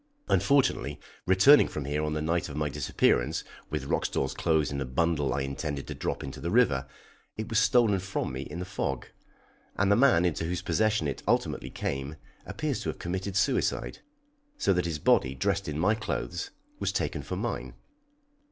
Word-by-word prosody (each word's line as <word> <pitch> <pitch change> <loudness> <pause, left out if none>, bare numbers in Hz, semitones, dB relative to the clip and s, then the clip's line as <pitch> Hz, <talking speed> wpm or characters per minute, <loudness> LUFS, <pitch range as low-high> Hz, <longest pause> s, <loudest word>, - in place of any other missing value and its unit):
Unfortunately, 140 -2 +2 0.3
returning 95 +11 +7
from 70 - -5
here 75 +2 -1
on 75 0 -1
the 75 0 -2
night 80 0 0
of 70 - -7
my 75 -1 0
disappearance, 70 -3 +1 0.3
with 75 -2 -3
Roxdal's 70 0 -1
clothes 80 0 +1
in 70 0 -3
a - - -1
bundle 75 +2 0
I - - 0
intended 70 +1 -3
to - - -5
drop - - -3
into 65 - -7
the 85 - -2
river, 95 - +3 0.5
it 110 -1 -4
was 110 - +3
stolen 115 -6 +4
from 95 -6 -3
me 65 - -4
in 75 +4 -7
the 90 - -4
fog, 100 +2 -3 0.7
and 100 +1 +2
the - - +6
man 120 -8 +5
into 80 -1 0
whose 90 +1 -3
possession 110 -7 +1
it 70 - -4
ultimately - - 0
came 70 +2 -4 0.3
appears - - -2
to - - -3
have - - -4
committed 95 +2 -4
suicide, 100 - 0 0.6
so 100 - +2
that 90 -1 0
his 80 -3 -2
body 65 -2 +3
dressed 100 +5 0
in 75 - -3
my 90 +7 +3
clothes 110 -5 -3 0.3
was - - 0
taken - - -2
for - - -5
mine. - - -4
85 Hz, 185 wpm, -28 LUFS, 70-100 Hz, 0.7 s, returning